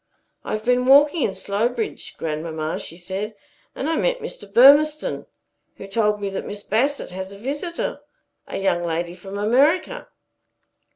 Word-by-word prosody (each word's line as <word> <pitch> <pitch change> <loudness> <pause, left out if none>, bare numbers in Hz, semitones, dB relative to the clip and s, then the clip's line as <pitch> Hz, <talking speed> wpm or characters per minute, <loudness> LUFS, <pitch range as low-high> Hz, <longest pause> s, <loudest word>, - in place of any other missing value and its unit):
"I - - -4
have 215 +1 -3
been 250 +1 +2
walking 290 +4 +6
in 195 - 0
Slowbridge, 225 +3 -2
grandmamma," 155 0 -3
she 165 - -8
said, 195 +4 -5 0.4
"and 275 - -3
I 325 0 0
met - - +1
Mr. 205 - -7
Burmistone, 290 +7 +5 0.5
who - - -9
told 210 +1 +1
me 200 -1 -3
that 195 - -4
Miss 205 0 -6
Bassett 265 +2 0
has 190 +1 -6
a 200 - -10
visitor 290 - -3 0.5
a - - -5
young 190 -3 0
lady 170 +1 -2
from 195 +2 -8
America." 285 - +2
210 Hz, 155 wpm, -22 LUFS, 190-280 Hz, 0.5 s, walking